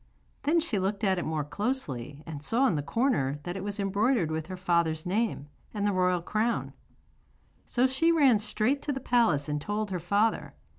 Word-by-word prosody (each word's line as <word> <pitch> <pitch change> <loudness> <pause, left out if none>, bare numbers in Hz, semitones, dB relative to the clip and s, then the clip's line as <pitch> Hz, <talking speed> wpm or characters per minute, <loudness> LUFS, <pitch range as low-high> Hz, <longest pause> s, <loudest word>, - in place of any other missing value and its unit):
Then 315 +4 +3
she 285 - -1
looked 195 +3 -2
at 190 -3 +2
it - - -3
more 155 -1 -1
closely 145 - -4
and 150 -3 -7
saw 235 - +1
in 230 - +3
the 150 - 0
corner 145 - 0
that 175 +3 -4
it 195 - -4
was 205 0 -4
embroidered 200 - +1
with 155 0 -3
her 185 0 -6
father's 170 -3 +1
name 195 -5 -1 0.3
and 205 -1 -1
the 205 - +2
royal 180 -2 +1
crown. 220 +5 -1 0.9
So 250 +1 +2
she 265 +6 +2
ran 275 -9 +5
straight 215 +6 0
to 295 - -2
the 265 - -3
palace 230 - +2
and 150 0 -2
told 210 +3 -2
her 180 - -1
father. 205 +6 0
200 Hz, 195 wpm, -28 LUFS, 160-235 Hz, 0.9 s, ran